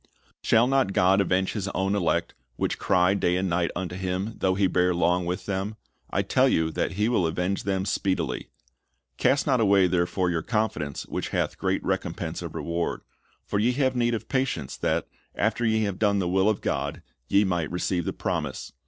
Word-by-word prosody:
"Shall 115 +1 +4
not 130 -6 +2
God 95 +2 +4
avenge 95 0 +1
His 105 -3 -3
own 95 +1 +1
elect, 95 -5 0 0.2
which - - -2
cry 90 +1 +3
da} 90 -3 +1
and 95 +1 0
night 85 -1 +1
unto 90 -1 -4
Him, 95 +3 -2
though 95 0 +2
He 100 0 +2
bear 90 -1 +2
long 90 0 +1
with 90 +1 -3
them? 100 +2 -2 0.3
I - - 0
tell - - +3
you 80 0 +1
that - - -1
He 105 +3 +1
will 105 -8 +2
avenge 90 +4 -2
them 95 -1 0
speedily." 95 -2 -1 0.7
"Cast 140 - +2
not 130 -4 +2
away 100 -3 +5
therefore 90 0 +1
your 85 -1 0
confidence, 105 - -2
which - - -4
hath - - -1
great - - 0
rec&mpense - - -2
of - - -7
reward. 85 0 -2 0.4
For 100 - -1
ye 120 +4 +2
have 130 -1 +1
need 120 -1 +2
of 110 - -6
patience, 135 0 -1
that, 80 +1 0 0.3
after 120 - 0
ye 110 -1 +2
have 100 -3 -2
done 100 -2 +3
the 95 -3 0
will 95 +3 +3
of 110 - -1
God, - - -2 0.2
ye 100 +1 +4
might 85 -5 -1
receive 90 0 -1
the - - -1
promise. - - -3
95 Hz, 195 wpm, -26 LUFS, 90-105 Hz, 0.7 s, away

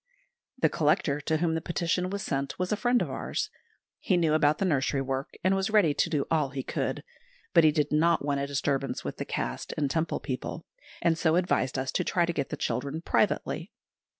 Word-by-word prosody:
The - - +4
Collector 155 -2 +1
to 155 +2 0
whom 165 0 +1
the 160 - -1
petition 175 +2 -1
was 200 +1 -3
sent 140 -1 -2
was 180 0 -2
a - - +3
friend 245 +3 +2
of - - -5
ours. - - -3 0.5
He 185 - +1
knew 165 -3 +2
about 150 -1 +3
the 195 - 0
nursery 140 -4 +1
work, 135 +1 -3
and 190 +1 +3
was 195 +2 0
ready 205 -9 +4
to 165 - +1
do 150 -4 0
all 155 -4 +2
he 135 -1 -4
could; - - -2 0.5
but 170 -3 +7
he 155 - +6
did 150 -1 0
not 160 0 +3
want 140 -1 0
a 140 - -2
disturbance 140 -1 -1
with - - -5
the - - -4
Caste - - -4
and 145 -2 0
Temple 160 +1 0
people, 135 +5 -5 0.4
and 165 -1 +2
so 160 -1 +3
advised 170 -8 +1
us 130 0 -1
to - - 0
try 175 -1 +2
to 170 - -2
get 140 -4 -2
the - - -4
children 140 +7 -2
privately. - - 0
155 Hz, 215 wpm, -28 LUFS, 140-170 Hz, 0.5 s, but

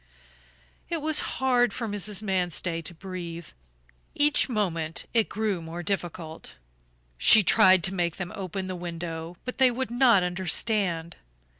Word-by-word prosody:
It 335 - -1
was 310 0 +2 0.2
hard 250 -2 +2
for 230 - -4
Mrs. 205 0 -2
Manstey 175 -4 -1
to 170 - -7
breathe; 170 -2 -7 0.7
each 290 -1 +3
moment 170 -8 -2
it 225 -2 +2
grew 210 -5 -1
more 165 +2 -7
difficult. 170 - -4 0.6
She 215 - +7
tried 185 0 +5
to 190 - -1
make 175 -3 -1
them 190 0 -6
open 190 -1 -4
the 185 0 -4
window, 170 -1 -6
but 250 - -6
they 260 -1 +6
would 245 0 -3
not 240 -6 +5
understand. 180 -1 -1
185 Hz, 140 wpm, -26 LUFS, 170-220 Hz, 0.7 s, She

